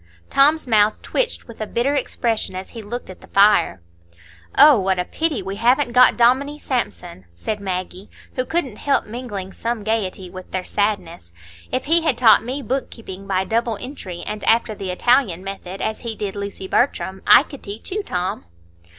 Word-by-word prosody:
Tom's 300 +3 +4
mouth 215 -2 +3
twitched - - -2
with 230 -2 -11
a 215 - -3
bitter 245 +6 0
expression 235 -7 -1
as 185 +1 -6
he 230 - -8
looked 235 +4 -6
at 185 - -14
the - - -15
fire. 200 - +3 0.7
"Oh, 295 -7 +8
what 190 -1 +1
a 180 - -1
pity 310 - -2
we 195 +1 -5
haven't 245 +3 +2
got 250 +1 +6
Dominie 260 +5 +3
Sampson!" 180 - -4
said 210 - -4
Maggie, 185 0 -5 0.2
who 255 - -1
couldn't 270 -7 -2
help 280 -1 +1
mingling 210 -5 -6
some 230 -2 -3
gayety 200 -4 -2
with 185 +1 -10
their 185 -1 -3
sadness. 180 - -2 0.4
"If 255 - -1
he 330 +3 +4
had 300 -7 +1
taught 235 -3 +6
me 260 +4 -4
book 265 +2 -2
keeping 195 -4 -10
by 190 -1 0
double 230 0 0
entry 200 -10 -7
and 210 0 -5
after 225 -1 +3
the 195 -2 -6
Italian 190 -2 +2
method, 195 -1 -7
as 220 - -2
he 230 -2 -5
did 205 -2 -4
Lucy 200 -1 -6
Bertram, 190 -5 0
I - - +8
could 280 -2 -12
teach 205 - -8
you, 420 +3 -1
Tom." 185 - -3
220 Hz, 185 wpm, -21 LUFS, 190-255 Hz, 0.7 s, Oh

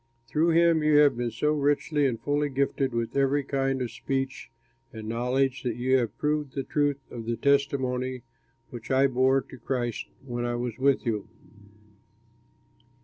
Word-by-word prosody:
Through 155 +7 +2
him 170 -1 +4
you 150 -1 +4
have 145 -3 +6
been 120 0 -2
so 150 +7 0
richly 145 0 +1
and 115 -4 -2
fully 145 0 0
gifted 135 0 0
with 115 -1 -3
every 140 +1 +2
kind 135 -1 -1
of 120 - -5
speech 135 0 -3 0.4
and 110 -1 -8
knowledge 125 +3 0
that 120 -4 -2
you 130 +2 +1
have 120 -4 -2
proved 150 -2 -1
the 135 - -1
truth 145 -1 0
of 115 -1 -7
the 115 0 -1
testimony 130 -3 0 0.5
which 120 -2 -9
I 135 0 +4
bore 130 +1 +3
to 130 - -13
Christ 120 -1 -3 0.2
when 120 -2 -3
I 120 0 -1
was 120 0 -4
with 135 0 +2
you. 110 -4 -2
135 Hz, 165 wpm, -27 LUFS, 120-140 Hz, 0.5 s, have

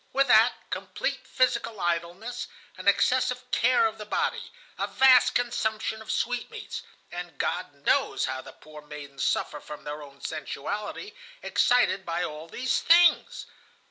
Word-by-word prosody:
With 275 0 +2
that, 225 +2 +6 0.2
complete - - -3
physical 240 -4 0
idleness, 175 +8 -2 0.3
an - - -8
excessive 250 0 +2
care 250 -1 +4
of 220 0 -2
the 210 - -6
body, 460 - -1 0.3
a - - 0
vast 260 -1 +5
consumption 220 -2 -1
of 220 - -5
sweetmeats; 245 -1 -3 0.3
and 175 -4 -7
God 180 -1 -2
knows - - +2
how 130 0 -3
the - - -12
poor 155 0 -13
maidens 145 -2 -8
suffer 150 - 0
from 150 0 -10
their 150 +1 -6
own 140 -1 -13
sensuality, 205 - -5 0.3
excited 245 -6 +3
by 170 0 -2
all 155 0 -6
these 250 +9 -1
things. 345 +1 +4
210 Hz, 140 wpm, -27 LUFS, 155-245 Hz, 0.3 s, that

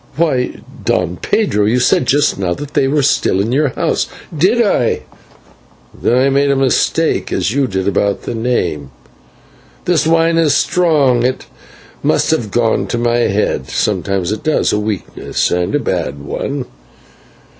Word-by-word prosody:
"Why, 145 -6 0 0.2
Don 90 -1 0
Pedro, 150 - 0
you 115 +3 +2
said 125 0 +2
just 145 -6 +2
now 90 -2 -1
that 145 0 -8
they 135 - +2
were 145 +1 +1
still 95 - +2
in 105 +4 0
the 145 +2 +2
house." - - -1 0.3
"Did 190 +10 +2
I? 195 - +1 0.9
Then 120 - 0
I 135 +2 +3
made 140 +1 +2
a 140 - +3
mistake, 135 -1 +1
as 100 - 0
you 135 +1 +1
did 95 -2 -2
about 100 0 0
the - - -4
name; 90 - -1 1.0
this 165 -3 +2
wine 165 0 +3
is 150 -3 +3
strong, 150 -9 +2
it 130 +2 -1 0.6
must - - +1
have 120 -10 0
gone 115 +2 +1
to 120 - -2
my 120 0 +1
head; 100 - 0
sometimes 95 -1 -1
it 110 - -3
does 155 - +1
a 105 - +1
weakness, 105 -3 -2
and 90 0 0
a - - +2
bad 70 - -2
one. 130 - -4
125 Hz, 160 wpm, -15 LUFS, 100-145 Hz, 1.0 s, I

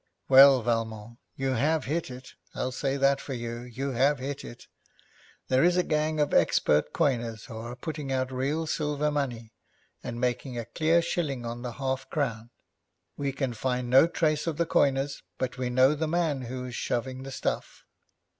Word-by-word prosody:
'Well, 135 -2 +8
Valmont, 115 -1 -2 0.2
you 135 0 -1
have 150 +6 +1
hit 160 +2 -2
it. 125 0 -10 0.2
I'll 130 - -2
say 135 +2 -1
that 140 0 +3
for 135 - -5
you; 120 0 -5
you 125 +3 -5
have 135 +4 +3
hit 135 +2 -5
it. 120 - -10 0.8
There 130 +1 +3
is 175 +1 +4
a 180 - +3
gang 155 -1 0
of 150 - +1
expert 75 +1 +3
coiners 115 -5 -1
who 115 - -9
are 120 +2 -6
putting 145 +1 -5
out 130 0 -1
real 140 +5 -1
silver 150 -1 -1
money, 120 -6 -3 0.5
and 120 - -5
making 125 +1 -2
a 115 - -3
clear 160 +7 +2
shilling 145 -8 -2
on 120 +1 -5
the 120 -1 -5
half 130 +1 -3
crown. 115 -6 -2 0.7
We 140 -1 -2
can 135 -2 -2
find 125 +1 -2
no 135 +5 +7
trace 155 -2 0
of 160 -3 -1
the 170 - +2
coiners, 140 -2 +1 0.2
but 125 0 -3
we 125 -1 -1
know 130 +3 +4
the 155 +1 -2
man 160 -4 0
who 125 +1 -5
is 125 - -7
shoving 130 +2 -2
the 135 - -7
stuff.' 135 - -4
130 Hz, 185 wpm, -28 LUFS, 120-150 Hz, 0.8 s, Well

